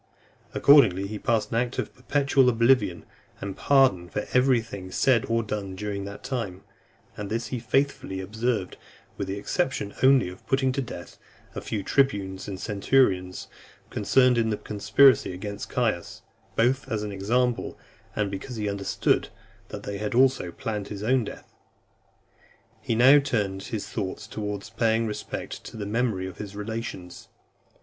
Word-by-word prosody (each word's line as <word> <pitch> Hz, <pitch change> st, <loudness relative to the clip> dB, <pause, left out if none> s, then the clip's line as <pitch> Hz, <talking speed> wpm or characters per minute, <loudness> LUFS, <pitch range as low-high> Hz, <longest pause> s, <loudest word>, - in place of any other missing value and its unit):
Accordingly, 135 Hz, -10 st, +6 dB
he 105 Hz, +1 st, -5 dB
passed 110 Hz, -3 st, 0 dB
an 115 Hz, -, 0 dB
act 120 Hz, +1 st, -1 dB
of -, -, -3 dB
perpetual 135 Hz, 0 st, +2 dB
oblivion 115 Hz, -6 st, +2 dB, 0.3 s
and 100 Hz, -1 st, -5 dB
pardon 130 Hz, -11 st, +3 dB
for 105 Hz, -, -3 dB
every 125 Hz, -1 st, +4 dB
thing 100 Hz, -5 st, -8 dB
said 125 Hz, +3 st, +2 dB
or 115 Hz, 0 st, +1 dB
done 100 Hz, -3 st, -4 dB
during 100 Hz, 0 st, -4 dB
that 100 Hz, 0 st, -9 dB
time; 115 Hz, -8 st, -4 dB, 0.5 s
and 105 Hz, -1 st, -6 dB
this 115 Hz, 0 st, -2 dB
he 125 Hz, -, -3 dB
faithfully 125 Hz, -5 st, 0 dB
observed, 110 Hz, +1 st, -2 dB, 0.4 s
with 100 Hz, -, -4 dB
the 95 Hz, +1 st, -3 dB
exception 115 Hz, -, -1 dB
only 130 Hz, -4 st, +5 dB
of 90 Hz, +1 st, -10 dB
putting 135 Hz, -1 st, +2 dB
to 135 Hz, -, -1 dB
death 125 Hz, -, -9 dB, 0.3 s
a -, -, -5 dB
few 105 Hz, -3 st, -3 dB
tribunes 100 Hz, -8 st, 0 dB
and 95 Hz, -2 st, -5 dB
centurions 100 Hz, -4 st, +1 dB, 0.4 s
concerned 125 Hz, -2 st, +3 dB
in 110 Hz, -1 st, +1 dB
the 105 Hz, -, -1 dB
conspiracy 110 Hz, +3 st, +4 dB
against 100 Hz, +2 st, -6 dB
Caius, 110 Hz, -8 st, -1 dB, 0.3 s
both 130 Hz, +4 st, +1 dB
as 105 Hz, -1 st, -1 dB
an 105 Hz, -, -4 dB
example, 120 Hz, +5 st, 0 dB, 0.4 s
and 105 Hz, -2 st, 0 dB
because 100 Hz, +6 st, -6 dB
he 105 Hz, -2 st, -2 dB
understood 100 Hz, -1 st, 0 dB, 0.4 s
that -, -, -8 dB
they 100 Hz, -1 st, -5 dB
had 105 Hz, +2 st, -2 dB
also 130 Hz, -8 st, +3 dB
planned 105 Hz, +3 st, -4 dB
his 105 Hz, -1 st, -6 dB
own 125 Hz, +2 st, +3 dB
death. -, -, -10 dB, 1.3 s
He 115 Hz, -, -1 dB
now 130 Hz, +5 st, +7 dB
turned 105 Hz, -8 st, -1 dB
(303) -, -, -9 dB
his 110 Hz, -3 st, -3 dB
thoughts 100 Hz, 0 st, -4 dB
towards 105 Hz, -2 st, -5 dB
paying 115 Hz, 0 st, +1 dB
respect 105 Hz, -1 st, -5 dB
to -, -, -9 dB
the 105 Hz, -, -4 dB
memory 110 Hz, -3 st, 0 dB
of 95 Hz, -, -8 dB
his 100 Hz, -1 st, -7 dB
relations. 105 Hz, -4 st, -6 dB
110 Hz, 160 wpm, -26 LUFS, 100-125 Hz, 1.3 s, now